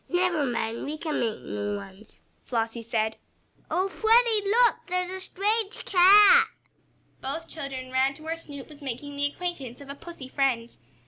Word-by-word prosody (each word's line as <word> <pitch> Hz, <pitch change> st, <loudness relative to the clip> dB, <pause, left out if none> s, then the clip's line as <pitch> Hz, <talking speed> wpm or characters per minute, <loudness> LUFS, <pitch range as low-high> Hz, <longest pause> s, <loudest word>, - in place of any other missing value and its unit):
"Never 355 Hz, -5 st, +1 dB
mind, 230 Hz, -1 st, -2 dB
we 300 Hz, +2 st, -4 dB
can 310 Hz, -1 st, -2 dB
make 225 Hz, -, -2 dB
new 105 Hz, -3 st, -3 dB
ones," 190 Hz, -, -11 dB, 0.2 s
Flossie 230 Hz, -1 st, -2 dB
said. 220 Hz, -1 st, -1 dB, 0.5 s
"Oh, 365 Hz, +4 st, +1 dB
Freddie, 440 Hz, 0 st, +3 dB
look! 475 Hz, 0 st, +3 dB
There's 365 Hz, 0 st, -1 dB
a 375 Hz, -, -4 dB
strange 415 Hz, +3 st, -1 dB
cat!" 410 Hz, +5 st, +7 dB, 0.7 s
Both 320 Hz, +5 st, -5 dB
children 270 Hz, -4 st, -7 dB
ran 265 Hz, +1 st, +2 dB
to 310 Hz, -, -14 dB
where 320 Hz, +1 st, -3 dB
Snoop 285 Hz, -4 st, -9 dB
was 300 Hz, -1 st, -14 dB
making 280 Hz, +2 st, -6 dB
the 285 Hz, 0 st, +1 dB
acquaintance 285 Hz, -6 st, -5 dB
of 280 Hz, -1 st, -12 dB
a -, -, -5 dB
pussy 315 Hz, -3 st, -10 dB
friend. 255 Hz, -4 st, -1 dB
290 Hz, 165 wpm, -26 LUFS, 245-365 Hz, 0.7 s, cat